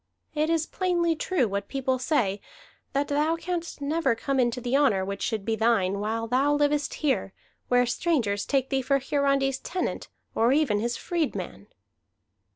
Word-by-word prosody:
It 305 Hz, +1 st, 0 dB
is 325 Hz, -1 st, +1 dB
plainly 345 Hz, -3 st, 0 dB
true 305 Hz, -5 st, 0 dB
what 200 Hz, 0 st, -3 dB
people 260 Hz, -1 st, -1 dB
say, 215 Hz, -8 st, 0 dB, 0.5 s
that 280 Hz, +1 st, +1 dB
thou 300 Hz, +3 st, +1 dB
canst 340 Hz, -2 st, -4 dB
never 285 Hz, -3 st, +1 dB
come 270 Hz, +3 st, -1 dB
into 245 Hz, 0 st, +1 dB
the 245 Hz, +1 st, -1 dB
honor 230 Hz, -10 st, +3 dB
which 200 Hz, +1 st, -5 dB
should 215 Hz, -3 st, -2 dB
be 225 Hz, -, 0 dB
thine, 210 Hz, -4 st, +2 dB
while 225 Hz, +2 st, -2 dB
thou 265 Hz, +5 st, +2 dB
livest 290 Hz, 0 st, +1 dB
here, 260 Hz, -8 st, 0 dB, 0.3 s
where 245 Hz, 0 st, +4 dB
strangers 235 Hz, -7 st, 0 dB
take 270 Hz, -2 st, +1 dB
thee 270 Hz, -1 st, +2 dB
for 275 Hz, +2 st, +2 dB
Hiarandi's 275 Hz, -1 st, +1 dB
tenant, 370 Hz, -, -3 dB, 0.3 s
or 230 Hz, +2 st, +3 dB
even 280 Hz, -9 st, +2 dB
his 235 Hz, +2 st, -1 dB
freedman." 335 Hz, -4 st, -3 dB
270 Hz, 165 wpm, -26 LUFS, 230-295 Hz, 0.5 s, where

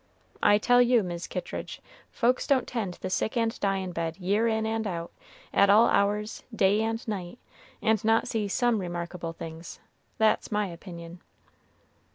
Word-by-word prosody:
I 205 Hz, 0 st, +6 dB
tell 245 Hz, +3 st, +4 dB
you, 245 Hz, -2 st, +4 dB
Mis' 175 Hz, -1 st, -5 dB
Kittridge, -, -, -5 dB, 0.3 s
folks 250 Hz, +1 st, +1 dB
don't 265 Hz, -3 st, +2 dB
tend 205 Hz, -7 st, -3 dB
the 185 Hz, -, -3 dB
sick 220 Hz, +5 st, -1 dB
and 230 Hz, -1 st, +2 dB
dyin' 195 Hz, -2 st, -1 dB
bed 165 Hz, 0 st, -3 dB
year 200 Hz, +5 st, +1 dB
in 220 Hz, -1 st, 0 dB
and 220 Hz, 0 st, -1 dB
out, 170 Hz, -3 st, -4 dB, 0.4 s
at 200 Hz, -, +5 dB
all 215 Hz, +3 st, +7 dB
hours, 210 Hz, +2 st, 0 dB
day 205 Hz, -1 st, +3 dB
and 225 Hz, +1 st, -2 dB
night, 195 Hz, -1 st, -4 dB, 0.5 s
and 220 Hz, -2 st, +2 dB
not 225 Hz, +1 st, +3 dB
see 220 Hz, -4 st, -1 dB
some 235 Hz, +2 st, +1 dB
remarkable 175 Hz, -1 st, -5 dB
things; 165 Hz, +1 st, -9 dB, 0.4 s
that's 220 Hz, 0 st, +2 dB
my 210 Hz, 0 st, +1 dB
opinion." 170 Hz, -1 st, -9 dB
205 Hz, 160 wpm, -27 LUFS, 180-225 Hz, 0.5 s, all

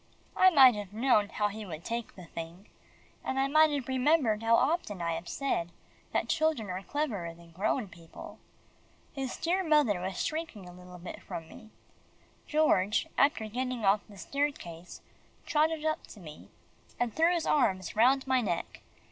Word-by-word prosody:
I 375 Hz, -, +7 dB
might 270 Hz, -7 st, +8 dB
have 205 Hz, -2 st, -7 dB
known 220 Hz, -3 st, +3 dB
how 210 Hz, -1 st, 0 dB
he 215 Hz, +2 st, -7 dB
would 170 Hz, -4 st, -8 dB
take 235 Hz, 0 st, -4 dB
the 185 Hz, -, -11 dB
thing, 165 Hz, +4 st, -9 dB, 0.6 s
and 265 Hz, -, -3 dB
I 270 Hz, 0 st, +2 dB
might 310 Hz, +2 st, +5 dB
have 285 Hz, -3 st, -3 dB
remembered 260 Hz, -4 st, +2 dB
how 225 Hz, 0 st, +4 dB
often 265 Hz, -, 0 dB
I 170 Hz, -1 st, -1 dB
have 165 Hz, +1 st, -6 dB
said, 175 Hz, -12 st, -2 dB, 0.4 s
that -, -, 0 dB
children 315 Hz, -, 0 dB
are 185 Hz, +1 st, -4 dB
cleverer 205 Hz, -, -3 dB
than 170 Hz, 0 st, -17 dB
grown 205 Hz, +6 st, -1 dB
people. 170 Hz, -3 st, -12 dB, 0.7 s
His 270 Hz, -3 st, -4 dB
dear 365 Hz, +3 st, 0 dB
mother 295 Hz, -, +3 dB
was 185 Hz, 0 st, -3 dB
shrinking 310 Hz, -, -4 dB
a 180 Hz, -, -11 dB
little 180 Hz, 0 st, -12 dB
bit 175 Hz, +1 st, -9 dB
from 165 Hz, -1 st, -7 dB
me. 220 Hz, +5 st, -14 dB, 0.8 s
George, 215 Hz, -10 st, +2 dB
after 280 Hz, -5 st, +2 dB
getting 250 Hz, 0 st, -3 dB
off 200 Hz, +2 st, +4 dB
the 205 Hz, -, -13 dB
staircase, 185 Hz, -, -4 dB, 0.4 s
trotted 310 Hz, +1 st, +1 dB
up 310 Hz, 0 st, -1 dB
to 215 Hz, -, -13 dB
me, 155 Hz, -4 st, -12 dB, 0.5 s
and 240 Hz, -2 st, 0 dB
threw 330 Hz, +2 st, +4 dB
his 345 Hz, -2 st, 0 dB
arms 185 Hz, -, +1 dB
round 255 Hz, +4 st, +4 dB
my 260 Hz, -1 st, +2 dB
neck. 175 Hz, -7 st, -3 dB
225 Hz, 170 wpm, -30 LUFS, 185-285 Hz, 0.8 s, might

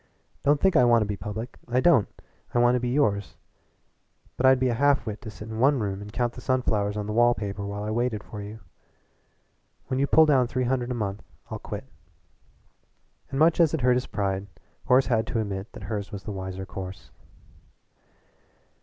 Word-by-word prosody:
Don't 145 Hz, 0 st, +3 dB
think 190 Hz, +3 st, +3 dB
I -, -, +6 dB
want 120 Hz, -2 st, +5 dB
to -, -, -2 dB
be 105 Hz, 0 st, -3 dB
public 105 Hz, +4 st, -6 dB
I 125 Hz, +1 st, +1 dB
don't. 165 Hz, -, +4 dB, 0.5 s
I -, -, +4 dB
want 120 Hz, +1 st, +5 dB
to 125 Hz, -, +2 dB
be 125 Hz, 0 st, -2 dB
yours. 115 Hz, -7 st, 0 dB, 1.0 s
But 130 Hz, -, +3 dB
I'd 130 Hz, -1 st, +6 dB
be 130 Hz, -, +2 dB
a -, -, +1 dB
half 140 Hz, +3 st, +2 dB
wit 110 Hz, 0 st, -5 dB
to 115 Hz, -, -7 dB
sit 105 Hz, 0 st, -10 dB
in 110 Hz, 0 st, -6 dB
one 140 Hz, +3 st, +4 dB
room 100 Hz, -2 st, -3 dB
and 105 Hz, 0 st, -9 dB
count 120 Hz, +1 st, -1 dB
the 125 Hz, -, -10 dB
sunflowers 105 Hz, -5 st, 0 dB
on 105 Hz, -, -2 dB
the 105 Hz, -, -4 dB
wall 120 Hz, +1 st, +4 dB
paper 100 Hz, -1 st, -4 dB
while 100 Hz, +1 st, -4 dB
I 105 Hz, -, -3 dB
waited 115 Hz, -2 st, -1 dB
for 105 Hz, -, -8 dB
you. 105 Hz, +2 st, -9 dB, 1.3 s
When 130 Hz, 0 st, 0 dB
you 140 Hz, -, +2 dB
pull 160 Hz, +2 st, +6 dB
down 135 Hz, -5 st, +3 dB
three 130 Hz, +1 st, -1 dB
hundred 125 Hz, -1 st, 0 dB
a 125 Hz, -, -2 dB
month 100 Hz, -3 st, -3 dB, 0.3 s
I'll -, -, -4 dB
quit." -, -, -6 dB, 1.5 s
And 135 Hz, -, -4 dB
much 160 Hz, +3 st, +4 dB
as 165 Hz, -2 st, +4 dB
it 155 Hz, -, -4 dB
hurt 125 Hz, 0 st, +4 dB
his 125 Hz, +1 st, -1 dB
pride, 95 Hz, -1 st, -2 dB, 0.4 s
Horace 130 Hz, +1 st, +5 dB
had 115 Hz, -2 st, +1 dB
to 115 Hz, -, -1 dB
admit 100 Hz, -1 st, -4 dB
that -, -, -10 dB
hers 105 Hz, -2 st, -4 dB
was 100 Hz, -1 st, -7 dB
the 105 Hz, -, -5 dB
wiser 95 Hz, -1 st, -5 dB
course. 95 Hz, 0 st, -8 dB
115 Hz, 205 wpm, -26 LUFS, 105-130 Hz, 1.5 s, I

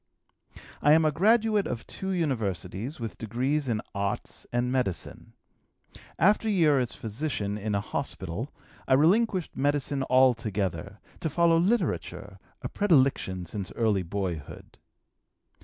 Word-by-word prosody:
"I 145 Hz, -, +6 dB
am 160 Hz, 0 st, +5 dB
a 155 Hz, -, +3 dB
graduate 215 Hz, +4 st, +3 dB
of 115 Hz, -, -4 dB
two 190 Hz, -, -6 dB
universities 125 Hz, -, -2 dB
with 115 Hz, -2 st, -6 dB
degrees 130 Hz, +6 st, -1 dB
in 110 Hz, -3 st, 0 dB
arts 100 Hz, -1 st, -4 dB
and 120 Hz, +1 st, 0 dB
medicine. 125 Hz, -9 st, -3 dB, 0.8 s
After 210 Hz, +4 st, +3 dB
a -, -, +2 dB
year 155 Hz, -8 st, +4 dB
as 125 Hz, -2 st, -2 dB
physician 110 Hz, -3 st, -3 dB
in 105 Hz, 0 st, -2 dB
a 100 Hz, -, +1 dB
hospital, 105 Hz, -, -4 dB, 0.4 s
I 130 Hz, -, +5 dB
relinquished 185 Hz, -, +2 dB
medicine 140 Hz, -1 st, 0 dB
altogether, 105 Hz, -7 st, +1 dB, 0.2 s
to 160 Hz, -, -2 dB
follow 165 Hz, +2 st, +3 dB
literature, 210 Hz, +8 st, -1 dB, 0.2 s
a -, -, -1 dB
predilection 135 Hz, -, +2 dB
since 95 Hz, +3 st, -5 dB
early 110 Hz, -4 st, +1 dB
boyhood. 90 Hz, -4 st, -5 dB
130 Hz, 125 wpm, -27 LUFS, 105-160 Hz, 0.8 s, I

